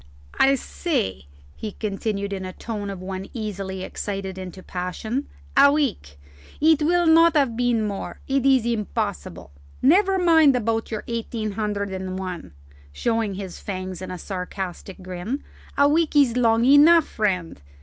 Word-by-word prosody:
"I 275 +1 +5
say," 95 - -3 0.3
he 215 -2 -6
continued 200 -1 -3
in 195 - -4
the 185 0 -6
tone 210 -2 -5
of 190 -2 -7
one 190 0 -5
easily 195 -4 -4
excited 195 -2 -5
into 185 0 -8
passion, 215 +9 -4 0.3
"a 280 +1 +7
week. 235 - -2 0.4
It 315 0 +4
will 345 +3 +3
not 330 0 +6
have 270 -6 +2
been 240 -2 +1
more. 200 -2 -5
It 270 -1 +1
is 265 -3 +4
impossible. 210 - -3 0.3
Never 380 +7 +4
mind 320 -6 +5
about 225 -1 -1
your 215 -2 -4
eighteen 230 -2 -3
hundred 205 -1 -2
and 185 0 -4
one," 180 - -6 0.4
showing 225 - -1
his 190 -2 -7
fangs 185 -2 -5
in 185 - -6
a 185 - -5
sarcastic 185 0 -6
grin; 185 +9 -4 0.3
"a 280 0 +5
week 310 +1 +1
is 275 -5 +4
long 230 -1 +3
enough, 295 +4 +7
friend. 180 - -2
215 Hz, 150 wpm, -23 LUFS, 190-275 Hz, 0.4 s, a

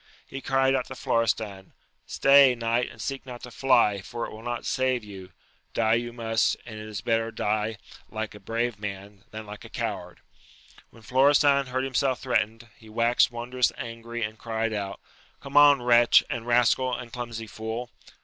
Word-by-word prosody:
He 135 - -8
cried 135 0 +2
out 130 -2 0
to 130 - -8
Florestan, 110 -6 -1 0.3
Stay, 135 -2 +6
knight, 115 +1 0
and - - -15
seek 135 -1 -4
not 125 -2 -10
to 125 - -8
fly, 120 -7 +3
for 115 +4 -5
it - - -8
will 110 - -10
not 120 0 -4
save 130 -2 0
you: 95 -3 -11 0.4
die 110 -1 +2
you 120 +1 0
must, 115 -1 0
and 110 -2 -8
it 110 - -8
is 105 -1 -6
better 115 -1 0
die 110 0 -1 0.3
like 110 0 -5
a 105 - -11
brave 115 +2 -2
man, 100 -1 -8
than 110 0 -8
like 105 0 -10
a - - -11
coward - - -5
I - - -26
When 115 - -18
Florestan 140 +2 +4
heard 130 +1 -2
himself 135 0 0
threatened, 115 -2 -1
he 110 - -17
waxed 115 +2 +3
won 120 0 -7
drous 125 -1 +2
angry, 115 -1 -6
and 110 0 -5
cried 115 -1 -2
out, 100 -2 -4 0.4
come 140 - -10
on, 145 -3 +7
wretch 120 -1 +6
and 120 -3 -4
rascal, 125 +1 +3
and 120 -2 -9
clumsy 120 -2 -5
fool 110 +3 -6
115 Hz, 185 wpm, -26 LUFS, 110-125 Hz, 0.4 s, on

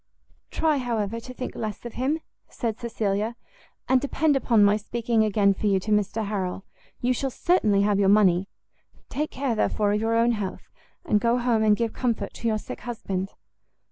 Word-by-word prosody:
"Try, 315 -2 +1
however, 230 -3 -2
to 255 - -10
think 255 0 -6
less 215 0 -5
of 235 - -6
him," 285 +6 -1 0.3
said 225 -2 -3
Cecilia; 220 -1 -1 0.5
"and 260 -1 +4
depend 285 +1 +1
upon 235 -5 +3
my 205 0 +5
speaking 225 +1 0
again 205 -2 +3
for 210 - -2
you 195 -1 +3
to 215 +3 -5
Mr 210 +1 +1
Harrel. 195 -2 -3 0.4
You 250 +1 +2
shall 270 +2 -2
certainly 215 - +2
have 205 -1 +2
your 195 -1 +4
money; 195 -3 +4 0.6
take 300 +2 -2
care, 265 -2 -2
therefore, 210 -1 +1
of 210 - 0
your 225 +1 +1
own 230 +1 +4
health, 210 -5 -5 0.3
and 210 -10 +2
go 235 +1 +2
home 240 -2 +1
and 210 -1 +4
give 230 -1 -1
comfort 230 -5 -2
to 235 - -4
your 220 -1 +1
sick - - -8
husband." 195 -5 -4
220 Hz, 185 wpm, -25 LUFS, 205-245 Hz, 0.6 s, my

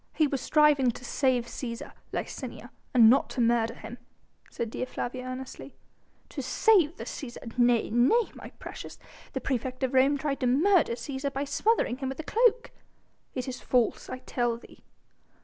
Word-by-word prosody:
"He 310 - +4
was 275 -3 -2
striving 300 -4 +4
to 245 +1 -6
save 255 -2 +1
Cæsar, 235 -1 -6 0.2
Licinia, - - -6 0.2
and 235 -4 +7
not 250 +5 +4
to - - -6
murder 230 -1 +2
him," 230 +3 -9 0.5
said 230 -2 -4
Dea 255 - -3
Flavia 255 0 -4
earnestly. 255 +1 -7 0.5
"To 280 - -5
save 340 - +3
the - - -6
Cæsar? 240 -4 -8
Nay! 240 -3 +3
nay! 260 - +3
my - - -10
precious, - - -9 0.4
the - - -3
praefect 255 0 -2
of 260 0 0
Rome 270 +2 +4
tried 280 -1 -2
to 255 - +1
murder 315 +2 +4
Cæsar 270 +3 -4
by 275 +1 -2
smothering 285 - +1
him 265 -1 -3
with 265 - -6
a - - -3
cloak." 470 +6 +2 0.6
"It 255 -1 -3
is 255 -1 -5
false 245 -3 +1
I - - -4
tell 240 -2 0
thee!" 235 - -17
260 Hz, 170 wpm, -28 LUFS, 240-285 Hz, 0.6 s, and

